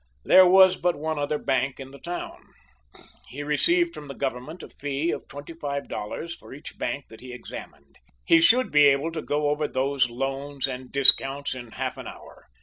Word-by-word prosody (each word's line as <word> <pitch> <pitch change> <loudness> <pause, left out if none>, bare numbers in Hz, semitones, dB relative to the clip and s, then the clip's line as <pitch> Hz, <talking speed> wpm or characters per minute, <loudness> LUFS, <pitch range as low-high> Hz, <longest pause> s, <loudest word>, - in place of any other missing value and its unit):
There 185 -1 +7
was 185 0 +6
but 175 0 0
one 155 0 -3
other 145 +1 -1
bank 130 -1 -1
in 135 0 -9
the 140 - -13
town. 175 0 -7 0.9
He 145 +3 -7
received 340 - +1
from 150 - -10
the 140 - -8
Government 135 +5 -5
a - - -10
fee 145 +3 -3
of - - -6
twenty 145 +3 -10
five 140 -3 -5
dollars 165 +11 -6
for - - -13
each 145 - -12
bank 140 - -3
that 110 - -14
he 125 0 -10
examined. 70 -12 -11 0.3
He 165 - +5
should 250 +9 +4
be 150 0 +6
able 140 +3 +3
to 160 -1 -5
go 145 0 -1
over 150 0 -1
those 130 -1 0
loans 135 +3 -3
and 130 -1 -7
discounts 140 0 +5
in 120 -3 -10
half - - -4
an - - -8
hour. - - -13
145 Hz, 195 wpm, -25 LUFS, 135-160 Hz, 0.9 s, There